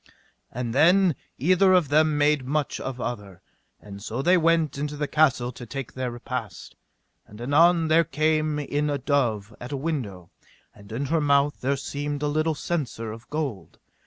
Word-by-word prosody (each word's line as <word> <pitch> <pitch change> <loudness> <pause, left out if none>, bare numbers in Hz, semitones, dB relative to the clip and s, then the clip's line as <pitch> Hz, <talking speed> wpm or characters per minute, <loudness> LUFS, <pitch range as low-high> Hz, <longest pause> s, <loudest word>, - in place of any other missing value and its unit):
And 120 -1 -4
then 175 +5 +5 0.2
either 185 +6 +4
of 175 -6 +3
them 155 0 +3
made 145 -1 +2
much 145 +2 -2
of 130 -1 -5
other, 100 -7 -5 0.4
and 100 -1 -11
so 115 +5 -4
they 180 +4 +5
went 165 -2 +2
into 150 0 -3
the 150 0 -2
castle 135 -6 +2
to 125 - -11
take 135 0 -6
their 130 -1 -3
repast. 120 -6 -6 0.5
And 105 - -14
anon 165 +6 +4
there 160 +2 +4
came 155 -1 0
in 145 0 -1
a 145 - 0
dove 120 -7 -1
at 125 - -8
a 140 - -2
window, 120 - -4 0.4
and 100 +1 -16
in 125 +6 -2
her 165 - +3
mouth 140 0 +2
there 140 +2 0
seemed 145 +1 -4
a - - +1
little 155 +2 0
censer 125 -10 -3
of 115 +2 -11
gold. 135 - -4
145 Hz, 175 wpm, -25 LUFS, 120-155 Hz, 0.5 s, then